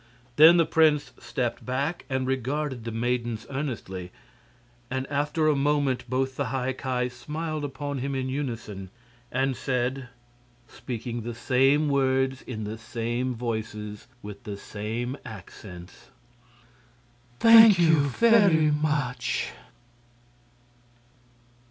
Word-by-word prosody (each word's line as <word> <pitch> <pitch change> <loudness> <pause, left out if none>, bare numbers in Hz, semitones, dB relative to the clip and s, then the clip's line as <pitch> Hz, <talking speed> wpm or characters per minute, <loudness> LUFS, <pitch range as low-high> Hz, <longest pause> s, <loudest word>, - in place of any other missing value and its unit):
Then 160 +5 +8
the 165 - +4
prince 155 -4 +3
stepped 120 0 -3
back 140 +7 -2
and 130 -1 -1
regarded 130 -1 -2
the 115 - -3
maidens 120 -1 -2
earnestly, 110 -10 -5 0.8
and 130 0 -2
after 150 +2 0
a 150 - +4
moment 140 -3 0
both 130 +1 -1
the 140 - 0
High 130 +1 -2
Ki 125 -1 -2
smiled 155 +4 -5
upon 145 0 -4
him 135 +2 -3
in 130 -1 -2
unison 115 -8 -5 0.4
and 130 +1 0
said 125 0 -2 0.6
speaking 120 -1 -6
the 120 +1 -6
same 135 +5 +3
words 135 -1 +1
in 110 -4 -6
the 110 +2 -5
same 120 +2 -3
voices 110 -3 -5
and 130 - -32
with 105 -1 -8
the 100 -1 -6
same 115 +6 -4
accents: 95 -3 -11 1.3
"Thank 225 - +8
you 160 -3 +5
very 160 - +4
much!" 150 -4 -1
130 Hz, 115 wpm, -26 LUFS, 120-145 Hz, 1.3 s, Then